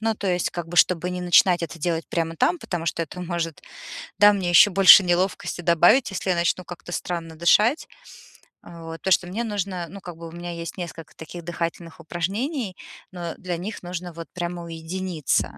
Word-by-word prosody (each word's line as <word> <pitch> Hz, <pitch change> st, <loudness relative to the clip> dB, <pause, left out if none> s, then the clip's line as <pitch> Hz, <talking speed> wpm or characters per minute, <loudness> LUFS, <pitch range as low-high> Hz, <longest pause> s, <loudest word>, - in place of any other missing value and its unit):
Ну, 225 Hz, 0 st, 0 dB
то 205 Hz, -, -5 dB
есть, 180 Hz, -2 st, +1 dB
как 175 Hz, -2 st, -6 dB
бы, 175 Hz, -, -7 dB
чтобы 180 Hz, 0 st, +3 dB
не 180 Hz, 0 st, -4 dB
начинать 175 Hz, 0 st, +4 dB
это 165 Hz, -, -5 dB
делать 165 Hz, +1 st, -2 dB
прямо 165 Hz, -1 st, -2 dB
там, 345 Hz, -, +1 dB
потому 170 Hz, -, -5 dB
что 165 Hz, -, -1 dB
это 175 Hz, +3 st, -8 dB
может, 170 Hz, -2 st, -4 dB, 0.6 s
да, 205 Hz, 0 st, +8 dB
мне 185 Hz, -3 st, -1 dB
ещё 175 Hz, +4 st, +7 dB
больше 195 Hz, +1 st, +9 dB
неловкости 180 Hz, 0 st, -1 dB
добавить, 175 Hz, +9 st, +4 dB
если 195 Hz, -, -4 dB
я 180 Hz, -, +3 dB
начну 170 Hz, +2 st, 0 dB
как-то 175 Hz, 0 st, -10 dB
странно 170 Hz, -2 st, -4 dB
дышать. 210 Hz, -, +3 dB, 0.8 s
Вот, 165 Hz, -1 st, -9 dB
то, 190 Hz, -, -2 dB
что 175 Hz, -, +3 dB
мне 205 Hz, +6 st, -3 dB
нужно, 195 Hz, -5 st, -3 dB
ну, 200 Hz, +3 st, -10 dB
как 175 Hz, -3 st, -9 dB
бы 165 Hz, 0 st, -8 dB
у 165 Hz, -, -11 dB
меня 175 Hz, +1 st, -7 dB
есть 170 Hz, +1 st, -7 dB
несколько 170 Hz, -3 st, -8 dB
таких 170 Hz, +2 st, -9 dB
дыхательных 170 Hz, 0 st, -5 dB
упражнений, 195 Hz, -, -3 dB, 0.4 s
но 175 Hz, -2 st, -6 dB
для 180 Hz, -2 st, -4 dB
них 190 Hz, +2 st, -6 dB
нужно 175 Hz, 0 st, -6 dB
вот 165 Hz, -1 st, -8 dB
прямо 175 Hz, -1 st, -4 dB
уединиться. 165 Hz, -1 st, -2 dB
175 Hz, 195 wpm, -24 LUFS, 170-185 Hz, 0.8 s, больше